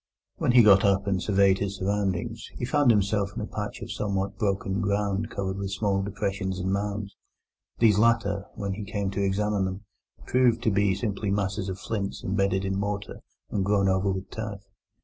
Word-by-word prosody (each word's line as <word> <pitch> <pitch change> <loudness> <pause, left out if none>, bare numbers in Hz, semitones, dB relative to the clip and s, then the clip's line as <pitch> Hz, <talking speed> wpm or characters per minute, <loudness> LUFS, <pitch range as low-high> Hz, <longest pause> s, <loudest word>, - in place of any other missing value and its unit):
When - - +1
he 125 -2 +8
got 100 -2 +7
up 100 -1 +3
and 95 -2 0
surveyed 100 -2 +3
his 100 0 -2
surroundings, 100 +3 -2
he 120 - -3
found 145 0 +3
himself 100 -2 +2
in - - -3
a - - -2
patch - - -5
of - - -7
somewhat 100 -1 -2
broken 100 -1 -1
ground 100 +1 0
covered 95 -2 -3
with 100 0 -3
small 100 -1 0
depressions 95 -1 -2
and 95 +1 -1
mounds. 100 0 -3 0.6
These 105 -3 +4
latter, 105 -3 +2
when 100 -1 -3
he 105 +2 -5
came 100 -1 -2
to 100 0 -1
examine 100 0 +1
them, 95 +1 -4 0.4
proved 125 -2 +3
to 110 - +3
be 100 -1 +2
simply 100 0 -2
masses 100 0 -1
of 95 - -4
flints 100 -1 -4
embedded 95 0 0
in 95 0 -1
mortar 100 0 -3 0.3
and 100 - 0
grown 100 0 +2
over 95 +1 +2
with 95 +1 -4
turf. 105 -3 -5
100 Hz, 190 wpm, -26 LUFS, 95-105 Hz, 0.6 s, he